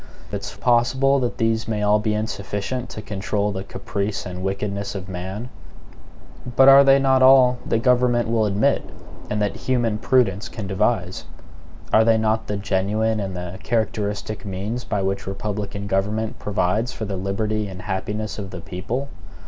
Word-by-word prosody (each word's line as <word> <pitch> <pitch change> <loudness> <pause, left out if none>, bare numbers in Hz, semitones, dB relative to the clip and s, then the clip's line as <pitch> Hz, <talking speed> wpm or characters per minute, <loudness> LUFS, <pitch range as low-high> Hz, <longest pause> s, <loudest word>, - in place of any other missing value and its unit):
It - - -3
is - - -6
possible 130 +3 +3
that 125 -2 -2
these 115 -1 0
may 105 -2 -1
all 105 +1 +4
be 105 0 0
insufficient 110 +3 -3
to 110 - -7
control 100 0 -1
the 95 -1 -4
caprice 100 +1 -4
and 90 -1 -6
wickedness 100 +1 -3
of 95 -1 -5
man. 95 +5 -5 1.1
But 135 +1 +7
are 135 +1 +9
they 135 0 +6
not 135 -1 +3
all 130 -1 +6
that 115 - 0
government 125 -1 +3
will 110 -1 +2
admit, 100 +1 +2 0.5
and 105 - -1
that 105 - -1
human 120 -4 0
prudence 110 -5 +2
can 110 -4 -6
devise? 95 -1 -1 0.7
Are 110 - +7
they 115 0 +4
not 110 0 0
the 105 - -2
genuine 105 +3 0
and 95 -2 -4
the 90 +1 -6
characteristic 105 -2 -2
means 105 +5 -4
by 100 -2 -2
which 95 0 -2
republican 100 0 -4
government 105 +3 -1
provides 105 +4 0
for 110 - -5
the 100 -1 -3
liberty 105 +3 -1
and 95 0 -8
happiness 105 +2 -3
of 100 -2 -5
the 95 - -7
people? 115 +11 -4
105 Hz, 165 wpm, -22 LUFS, 100-115 Hz, 1.1 s, are